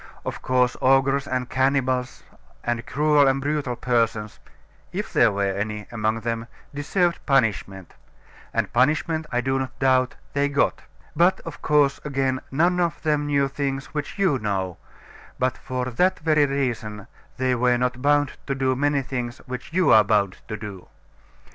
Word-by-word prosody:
Of - - -5
course, 125 -1 +2
ogres 135 +1 +3
and 130 -1 -2
cannibals, 130 -1 0 0.4
and 120 0 -1
cruel 150 -1 +3
and 135 0 +2
brutal 140 -3 -1
persons 115 -3 -1 0.5
(if - - -4
there 115 - +5
were 100 -1 0
any 105 +1 -3
among 110 -1 -1
them), 115 0 -3 0.3
deserved 170 +5 0
punishment 105 - 0 0.6
and - - -1
punishment, 155 +5 +1
I 125 -1 +1
do 135 +1 0
not 130 -1 -5
doubt, 130 -1 +2 0.2
they 145 0 +1
got. 140 0 +1 0.3
But, 180 +3 +4
of 165 -3 -9
course, 145 -2 +3
again, 135 -2 -1
none 175 +6 +2
of 170 -3 -1
them 150 -1 +1
knew 140 -1 +2
things 135 -1 -4
which 150 +4 -4
you 190 -9 +2
know; 95 -4 -2 0.6
but 130 0 0
for 130 -1 -4
that 180 +10 +1
very 155 -2 +3
reason 115 -7 -3 0.3
they 130 0 +1
were 125 0 +2
not 125 0 -1
bound 145 0 +3 0.2
to 135 - -1
do 130 -1 +1
many 145 +1 +1
things 125 -1 -4
which 125 +2 -7
you 185 +1 +3
are 110 - +8
bound 100 -2 +1
to 110 - -4
do. 100 -3 -9
130 Hz, 160 wpm, -24 LUFS, 120-145 Hz, 0.6 s, are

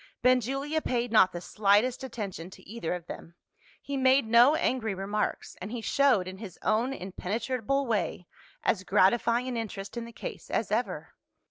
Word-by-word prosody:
Benjulia 270 +5 +2
paid 245 -3 -1
not 190 -4 +6
the 175 - -5
slightest 210 +7 +2
attention 200 -9 -6
to - - -15
either 205 -5 -3
of 175 -2 -8
them. 170 -1 -9 0.5
He 280 0 -3
made 265 0 +4
no 235 +6 +6
angry 225 -9 0
remarks 205 +3 -3
and 195 +4 -6
he 240 -1 -4
showed, 260 -7 +3
in 185 0 -8
his 195 -6 -9
own 235 +5 +1
impenetrable 235 +6 -2
way, 205 -6 -1 0.4
as 190 - +1
gratifying 235 +6 +3
an 250 -2 -3
interest 200 -3 -5
in 235 - -3
the 235 - -10
case - - -8
as 220 - -1
ever. 235 +4 -2
225 Hz, 165 wpm, -28 LUFS, 195-255 Hz, 0.5 s, not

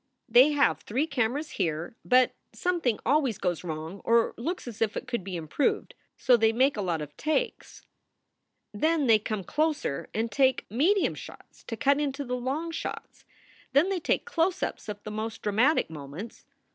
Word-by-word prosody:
They 255 +6 +6
have 220 - +3
three 240 - -1
cameras 280 +1 -1
here, 165 +3 -2
but 255 0 +4 0.2
something 340 - 0
always 270 -5 +2
goes 180 -5 -2
wrong, 160 +3 -6
or 230 0 +3
looks 330 +5 -4
as 230 -2 -8
if 220 -1 +1
it - - -5
could 235 -6 -2
be 185 -1 -5
improved; 170 - -1 0.2
so 255 - +5
they 225 -1 +4
make 260 +5 +3
a 210 - -2
lot 170 -5 -1
of 145 0 -11
takes. 315 - -2 0.9
Then 310 +7 +1
they 225 -3 +6
come 210 -1 -3
closer 300 - -1
and 225 +1 -2
take 265 -1 +2
medium 350 - +2
shots - - -12
to 230 - -5
cut 280 +5 +3
into 285 -1 -2
the 250 0 -2
long 275 +7 -2
shots. - - -6 0.5
Then 295 +8 +4
they 385 -2 0
take - - 0
close 370 -4 0
ups - - -4
of 205 0 -6
the 215 - -6
most 220 +1 -5
dramatic 225 +9 +3
moments. 155 +8 -9
240 Hz, 175 wpm, -28 LUFS, 205-295 Hz, 0.9 s, They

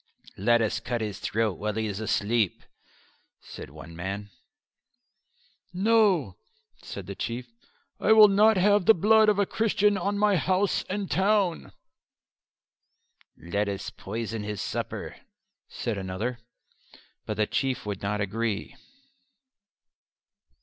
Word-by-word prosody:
"Let 120 +3 +3
us 110 +1 -1
cut 120 +1 -3
his 105 -3 -4
throat 110 -4 -1
while 105 0 -2
he 110 0 -1
is 100 -1 -4
asleep," 110 -1 0 0.8
said - - -10
one 80 +3 -12
man. 100 +4 -5 1.4
"No," 190 - +2 0.4
said 100 - -8
the 100 - -6
Chief. 120 +5 -5 0.5
"I 220 - +2
will 215 -1 +9
not 210 +2 +4
have 205 0 +3
the 225 - +8
blood 215 +4 +5
of 210 - +2
a 200 - +3
Christian 210 -1 +1
on 200 +3 -1
my 205 -2 +3
house 185 +4 +1
and 200 +1 -2
town." 195 -2 +1 1.7
"Let 100 +4 -2
us 100 0 -5
poison 115 +2 -5
his 105 -1 -5
supper," - - -4 0.5
said 110 -4 -3
another. 100 +7 -4 0.9
But - - -3
the 105 - +2
Chief 130 +2 -2
would 100 -2 -4
not 105 +1 -2
agree. 105 +1 -2
115 Hz, 125 wpm, -27 LUFS, -, 1.7 s, will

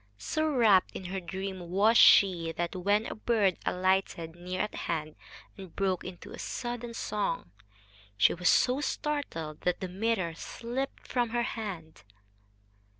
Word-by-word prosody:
So 310 - -1
rapt 225 -10 +4
in 185 - -7
her 190 +2 -3
dream 185 0 -6
was 205 +5 +4
she 180 -8 +6
that, 170 +2 -3
when 205 +4 +1
a - - -4
bird 215 -4 +1
alighted 180 -3 0
near 180 +1 -4
at 210 - -3
hand 155 -2 -3 0.4
and 190 -4 -11
broke 190 -2 0
into 185 -1 -9
sudden 240 -1 -4
song, 200 - -2 0.7
she 105 +3 +5
was 180 0 +1
so 255 +3 +3
startled 275 - -3
that 180 - 0
the 190 - -3
mirror 190 -2 -1
slipped 240 +10 -5
from 245 -2 0
her 240 +1 0
hand. 190 -10 -6
190 Hz, 145 wpm, -29 LUFS, 175-230 Hz, 0.7 s, she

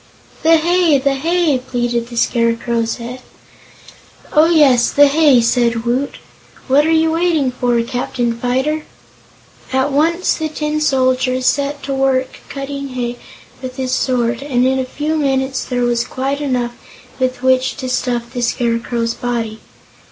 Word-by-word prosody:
"The 325 +1 +5
hay 340 -2 +3
the 275 +1 +1
hay!" 320 0 +1
pleaded 240 -2 -2
the 240 - -8
Scarecrow's 230 -1 0
head. 245 +2 -8 1.1
"Oh, 310 +1 +5
yes; 280 -8 +4
the 290 - +5
hay," 285 -3 +4
said 235 -1 +1
Woot. 255 +4 -1 0.5
"What 285 +3 +4
are - - +2
you 320 0 +3
waiting 325 -5 +1
for, 245 -1 0
Captain 245 0 -2
Fyter?" 260 +6 -1 0.9
At 265 +2 +1
once 330 +6 +2
the 315 -1 -3
Tin 305 0 -2
Soldier 255 -2 +1
set 280 +2 0
to 275 0 -3
work 265 -1 0
cutting 275 0 -5
hay 245 -1 -3 0.4
with 255 -1 -6
his 260 -1 -3
sword 245 -2 0
and 255 -3 0
in 265 0 +1
a 260 - -1
few 300 +4 -2
minutes 270 -2 0
there 245 -1 -1
was 240 -1 +1
quite 275 +2 -3
enough 250 -4 -1 0.5
with 255 -1 -1
which 260 0 +2
to 260 - -5
stuff 245 -1 -2
the 245 - -3
Scarecrow's 235 0 -1
body. 230 -3 -3
260 Hz, 150 wpm, -17 LUFS, 245-285 Hz, 1.1 s, The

